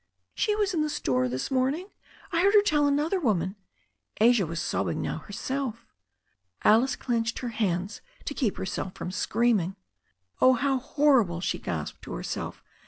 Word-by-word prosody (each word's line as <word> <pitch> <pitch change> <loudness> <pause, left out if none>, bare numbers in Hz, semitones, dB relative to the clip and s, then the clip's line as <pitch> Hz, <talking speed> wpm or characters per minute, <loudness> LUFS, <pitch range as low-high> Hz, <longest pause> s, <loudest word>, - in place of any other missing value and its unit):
"She 420 - +1
was 410 -3 0
in 325 - +1
the 305 - 0
store 125 - 0
this 130 - -3
morning. 270 +9 0 0.4
I 335 - +2
heard 400 +3 +4
her 410 - +7
tell 295 -7 +3
another 300 +7 +1
woman 195 - 0 0.3
" 95 -1 -39
Asia 225 -4 +5
was 165 0 -4
sobbing - - -1
now - - -2
herself. 230 +2 -4 0.8
Alice 235 +6 +4
clenched 230 -2 -1
her 245 - -3
hands 200 -3 -2 0.2
to - - -3
keep 245 -8 -1
herself 190 0 -4
from 180 - -5
screaming. 205 -2 +1 0.7
"Oh, 255 - +7
how 265 +2 +1
horrible!" 255 - +3
she 175 - -2
gasped, 80 -3 -4
to - - -8
herself. - - -5
235 Hz, 165 wpm, -27 LUFS, 190-285 Hz, 0.8 s, her